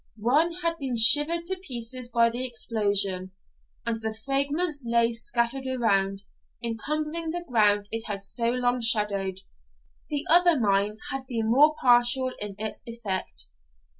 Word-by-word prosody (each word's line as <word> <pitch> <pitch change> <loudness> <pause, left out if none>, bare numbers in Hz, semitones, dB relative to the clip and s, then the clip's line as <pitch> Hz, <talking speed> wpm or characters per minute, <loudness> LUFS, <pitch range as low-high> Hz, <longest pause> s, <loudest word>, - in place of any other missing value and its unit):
One 285 +10 0
had 335 0 -2
been 265 -4 -4
shivered 295 +9 +7
to 375 +1 +2
pieces 250 -6 -5
by 230 -1 +1
the 245 +2 -4
explosion, 200 -6 0 0.5
and 230 -1 -4
the 220 0 -5
fragments 280 +6 -1
lay 235 0 +1
scattered 235 +3 -1
around, 200 -6 -1 0.4
encumbering 305 +8 -4
the 345 +1 -5
ground 205 -4 +1
it 225 0 -5
had 200 -2 -6
so 230 +4 +1
long 245 0 -1
shadowed. 200 -4 +1 0.7
The 295 0 -4
other 345 -3 +4
mine 205 -1 0
had 270 -1 -6
been 225 -3 -3
more 300 +5 +4
partial 245 +1 +3
in 205 -1 -6
its 220 0 -3
effect. 200 - -2
235 Hz, 140 wpm, -25 LUFS, 215-275 Hz, 0.7 s, shivered